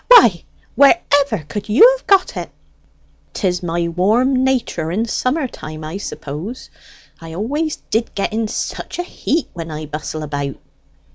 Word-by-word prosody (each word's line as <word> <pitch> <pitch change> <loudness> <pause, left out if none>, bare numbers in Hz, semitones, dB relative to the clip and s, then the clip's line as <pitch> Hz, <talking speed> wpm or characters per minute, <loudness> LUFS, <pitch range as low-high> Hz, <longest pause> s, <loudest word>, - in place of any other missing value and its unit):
Why, 315 - +7 0.3
wherever 280 - +3
could 205 0 -5
you 460 - +7
have - - -14
got 390 -2 +4
it?" - - -4 0.8
"'Tis 180 -3 0
my 170 -1 -1
warm 230 +10 +2
nater 245 -11 0
in 210 +7 0
summer 260 +5 0
time, 155 -8 -9
I 155 +5 -5
suppose. 190 - -7 0.5
I 165 0 -9
always 290 - -1 0.2
did 225 +1 0
get 200 - -1
in 220 0 0
such - - -4
a 355 - -1
heat 330 -2 -2
when 165 -2 -6
I 155 0 -5
bustle 155 +1 -5
about." 145 -2 -3
210 Hz, 150 wpm, -19 LUFS, 165-270 Hz, 0.8 s, Why